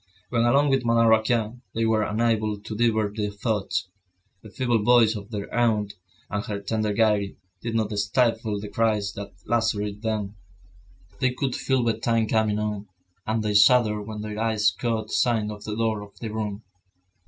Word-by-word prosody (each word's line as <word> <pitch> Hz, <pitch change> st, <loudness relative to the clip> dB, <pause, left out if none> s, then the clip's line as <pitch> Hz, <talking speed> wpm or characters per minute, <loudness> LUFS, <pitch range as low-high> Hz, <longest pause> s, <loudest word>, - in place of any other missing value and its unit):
When 120 Hz, -1 st, +2 dB
alone 140 Hz, +4 st, +4 dB
with 135 Hz, -1 st, +2 dB
Madame 115 Hz, 0 st, +3 dB
Raquin, 110 Hz, +1 st, +2 dB
they 115 Hz, 0 st, +1 dB
were 110 Hz, -1 st, +2 dB
unable 110 Hz, -1 st, 0 dB
to 105 Hz, +1 st, -7 dB
divert 110 Hz, -2 st, +1 dB
their 105 Hz, -1 st, -1 dB
thoughts; 100 Hz, -3 st, -2 dB, 0.5 s
the 110 Hz, -, -12 dB
feeble 120 Hz, 0 st, 0 dB
voice 120 Hz, -1 st, +5 dB
of 105 Hz, -1 st, -8 dB
their 105 Hz, -3 st, -6 dB
aunt, 110 Hz, -4 st, +1 dB, 0.3 s
and 100 Hz, +1 st, -3 dB
her 105 Hz, -1 st, -3 dB
tender 105 Hz, +1 st, -1 dB
gaiety, 105 Hz, -2 st, +1 dB, 0.2 s
did 115 Hz, -1 st, -3 dB
not 110 Hz, -1 st, 0 dB
stifle 110 Hz, 0 st, +1 dB
the 105 Hz, -, -6 dB
cries 105 Hz, -2 st, 0 dB
that 100 Hz, 0 st, -7 dB
lacerated 105 Hz, -3 st, 0 dB
them. 105 Hz, -3 st, -3 dB, 0.8 s
They 125 Hz, -1 st, +1 dB
could 130 Hz, -1 st, -1 dB
feel 130 Hz, -2 st, +1 dB
bedtime 115 Hz, 0 st, +1 dB
coming 110 Hz, -2 st, +1 dB
on, 105 Hz, -1 st, -3 dB, 0.4 s
and 110 Hz, 0 st, 0 dB
they 105 Hz, -1 st, 0 dB
shuddered 105 Hz, 0 st, +4 dB
when 110 Hz, -1 st, -5 dB
their 105 Hz, 0 st, -5 dB
eyes 110 Hz, -2 st, +2 dB
caught 115 Hz, -3 st, -3 dB
sight 110 Hz, -4 st, +1 dB
of 105 Hz, 0 st, -9 dB
the 105 Hz, -, -3 dB
door 110 Hz, -2 st, 0 dB
of 100 Hz, -1 st, -13 dB
their 110 Hz, -2 st, -6 dB
room. 105 Hz, -1 st, -4 dB
110 Hz, 175 wpm, -25 LUFS, 105-115 Hz, 0.8 s, voice